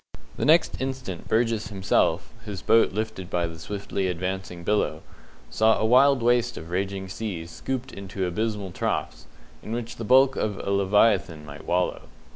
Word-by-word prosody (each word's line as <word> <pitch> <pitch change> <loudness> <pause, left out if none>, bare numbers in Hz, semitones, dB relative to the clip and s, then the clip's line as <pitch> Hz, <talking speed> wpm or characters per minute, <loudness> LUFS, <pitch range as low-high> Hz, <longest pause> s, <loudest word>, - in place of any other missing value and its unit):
The - - -2
next 160 0 +4
instant 130 -9 -4
Burgess 115 -2 +1
himself 95 -2 0
his 100 -5 -6
boat 115 - +4
lifted 105 -3 -4
by 90 -2 0
the 80 -1 -7
swiftly 100 +2 -3
advancing 90 0 -4
billow 85 -5 0 0.5
saw 110 0 +4
a - - 0
wild 130 +2 +5
waste 120 0 +2
of 80 +2 -8
raging 95 +1 -2
seas 95 -4 -5
scooped 130 +6 -4
into 95 -1 -4
abysmal 105 +1 -2
troughs, - - -3 0.3
in 110 - -6
which 120 0 -4
the 115 - -5
bulk 130 +3 +5
of 105 -2 -1
a 100 - -3
leviathan 100 -4 +2
might 75 +1 -10
wallow. 90 +1 -1
100 Hz, 160 wpm, -25 LUFS, 90-115 Hz, 0.5 s, wild